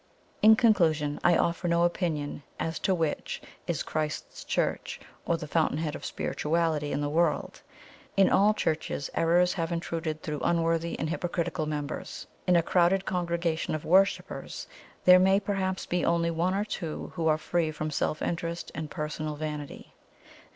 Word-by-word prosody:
"In 220 +1 +8
conclusion, 160 - +3
I 175 -1 +5
offer 170 +1 0
no 170 0 +3
opinion 165 -5 -1 0.2
as 160 0 -2
to 190 - +1
which 160 -3 -2 0.3
is - - -1
Christ's 155 -1 -4
Church, - - -1 0.3
or 170 - +2
the 155 -2 -7
Fountain 155 -1 +1
head 155 -1 -2
of - - -7
spirituality 155 -2 -1
in 140 - -1
the 145 - 0
world. 160 +2 0 0.6
In 195 - +6
all 210 +2 +4
Churches 155 -5 -2
errors 175 +2 +3
have 165 -2 -2
intruded 165 -2 -3
through 150 -2 -3
unworthy 165 0 +1
and 155 - -2
hypocritical 170 -2 -2
members. 150 -2 -4 0.2
In 180 - +5
a 170 - +4
crowded 185 +3 +3
congregation 170 -3 -1
of 155 - -5
worshippers 190 +4 +1 0.4
there 180 0 +9
may 190 +1 +4
perhaps 190 -2 -2
be 175 -1 -1
only 170 0 +2
one 175 +3 0
or 205 +1 0
two 170 -7 -5
who 165 -2 -1
are 155 -1 +4
free 160 0 0
from 155 0 -4
self 155 +1 -1
interest 170 0 -3
and 160 -2 -5
personal 150 0 -4
vanity. 150 -1 -6
165 Hz, 160 wpm, -28 LUFS, 155-180 Hz, 0.6 s, there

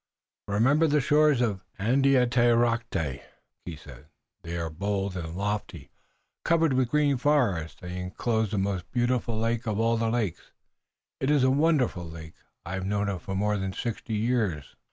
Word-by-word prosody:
"Remember 130 +11 +3
the 150 0 +3
shores 150 -1 +3
of 105 -6 0 0.2
Andiatarocte," 120 - +2 0.4
he 85 - -6
said. 70 -5 -14 0.3
"They 85 +1 -5
are 80 -1 -3
bold 100 +3 -2
and 85 -2 -5
lofty, 100 -6 -4 0.5
covered 165 -3 +3
with 130 -2 +1
green 145 -1 +2
forest, 115 - 0
and 90 - -6
they 90 - -5
enclose 110 +4 -1
the 105 - -2
most 95 -2 -2
beautiful 120 -2 0
of 115 -2 -1
all 115 +1 +2
the 115 0 0
lakes. 110 -7 -3 0.7
It 135 - -1
is 145 -3 +4
a 130 - +4
wonderful 140 - +2
lake. 80 0 -10 0.3
I 90 - -5
have 95 0 -3
known 105 0 0
it 95 -4 -5
more 105 +2 0
than 95 -1 -3
sixty 115 0 -4
years. 105 - -1
110 Hz, 155 wpm, -27 LUFS, 95-125 Hz, 0.7 s, is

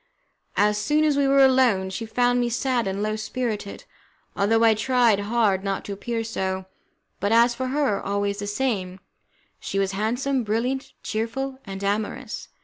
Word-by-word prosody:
As 210 0 +3
soon 295 +9 +2
as 300 -2 +3
we 280 -1 +2
were 275 0 +6
alone, 245 -8 +3
she 225 +4 -5
found 245 +2 +2
me 240 -1 +1
sad 240 -1 0
and 195 +2 -2
low 215 0 -1
spirited, 215 -2 -4 0.5
although 225 +3 +2
I 225 -1 +6
tried 235 -1 +3
hard 205 -2 +1
not 195 -1 -2
to 200 - -4
appear 225 +3 -3
so, 190 -4 -3 0.5
but, 200 +2 0
as 235 +1 +5
for 260 +2 -3
her, 270 -6 0
always 200 0 -1
the 205 - -4
same, 205 -5 -2 0.6
she 195 - -4
was 195 -1 +1
handsome, 245 +6 -1
brilliant, 235 +5 -2
cheerful, 260 +5 -3
and 195 -1 -7
amorous. 215 +4 -3
225 Hz, 165 wpm, -24 LUFS, 200-255 Hz, 0.6 s, were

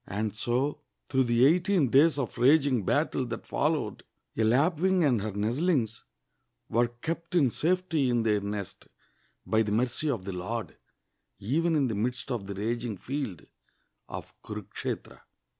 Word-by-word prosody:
And 105 +2 -2
so, 125 +5 -1 0.3
through 130 -2 +2
the 120 +1 +4
eighteen 175 -1 +3
days 150 +3 +5
of 130 -3 -3
raging 135 -3 +4
battle - - +1
that - - -6
followed, - - -1 0.3
a 110 - +1
lapwing 165 +10 +3
and 125 -8 +3
her 110 +1 -3
nest 110 +6 -1
Hngs 135 - +1 0.7
were 120 +2 +3
kept 165 +9 -5
in 140 -8 +4
safety 165 -4 +1
in 120 -2 +2
their 105 -2 +2
nest, 100 -1 -6 0.6
by 110 - +2
the 105 -2 -1
mercy 125 +7 0
of 110 -9 -2
the 95 - -4
lord, 105 +6 -4 0.6
even 155 - +1
in 140 -3 +2
the 115 - -2
midst 120 +5 -2
of 110 -6 -3
the 100 - -5
raging 115 +1 -2
field 130 - -4 0.6
of - - -7
Kunikshetra. - - -6
120 Hz, 155 wpm, -28 LUFS, 110-150 Hz, 0.7 s, days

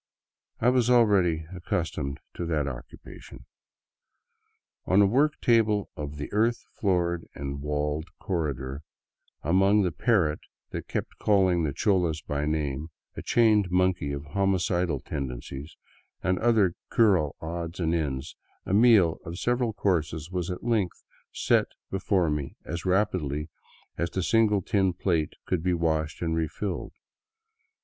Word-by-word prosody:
I 120 - +4
was 125 -2 +2
already 100 -10 +4
accustomed 85 -5 -3
to - - -5
that 75 -4 0
occupation. 60 -3 -10 1.4
On 95 - +4
a 100 - +7
work 140 +9 +2
table 110 -4 +2
of 75 0 -6
the 75 - -6
earth 115 +3 +1
floored 85 -4 0
and 70 0 -5
walled 75 +2 -2
corredor, 70 -6 -3 0.6
among 95 +6 +4
the 90 - 0
parrots 85 -5 +1 0.3
that - - -5
kept - - -4
calling 95 -4 +3
the 75 -3 0
cholas 85 -1 +1
by 75 -1 -3
name, 75 -1 -1 0.3
a - - -5
chained 110 -5 +3
monkey 90 -4 +1
of 70 +1 -5
homicidal 90 -3 0
tendencies, 70 +1 -6 0.5
and 95 -1 +1
other 110 -6 +3 0.2
cural 95 -11 +3
odds 85 +2 -5
and 85 -2 +1
ends, 70 -4 -2 0.3
a - - -2
meal 105 -7 +5
of 85 +1 -7
several 120 +2 0
courses 80 -6 -1
was 90 -1 -2
at 90 - -5
length 110 -6 0 0.3
set - - +2 0.2
before 95 -3 +1
me 75 -2 -3
as 85 +1 -5
rapidly 85 -6 0 0.5
as 85 +1 0
the 95 - -2
single 105 -2 +3
tin 95 -4 +1
plate 85 -4 0
could 90 -3 0
be 90 +1 +1
washed 80 -1 -1
and 80 -1 0
refilled. 80 +4 -3
85 Hz, 135 wpm, -27 LUFS, 75-100 Hz, 1.4 s, a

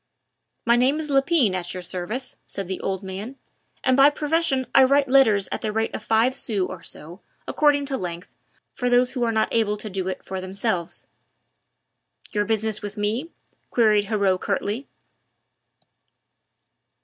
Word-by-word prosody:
"My 235 0 +5
name 265 +5 +2
is 305 -2 -4
Lepine 275 - +3
at 180 -1 -4
your 180 - -5
service," 200 +9 -4
said 195 -2 -5
the 190 - -4
old 190 0 -3
man, 200 +8 -7 0.5
"and 260 - +3
by 275 +2 +7
profession 295 -2 0
I 270 - +7
write 280 +1 +4
letters 225 -7 +4
at - - -3
the 215 - -2
rate 220 +1 -1
of - - -4
five 225 +4 +2
sous 210 -8 -1
or - - -8
so, 170 +6 -9 0.3
according 290 -2 +2
to 270 -1 -2
length, 175 -1 -6 0.4
for 250 -1 -1
those 245 +1 +3
who 250 - -1
are 230 - +1
not 220 -1 +1
able 215 -2 +1
to 210 0 -6
do 190 -1 -3
it 190 - -5
for 190 -1 -5
themselves." 185 -2 -3 1.3
"Your 205 0 0
business 220 -1 0
with 205 +1 -7
me?" 220 +10 -1 0.4
queried 215 -3 +3
Heriot 200 -3 +1
curtly. 205 +6 -2
220 Hz, 160 wpm, -23 LUFS, 195-260 Hz, 1.3 s, by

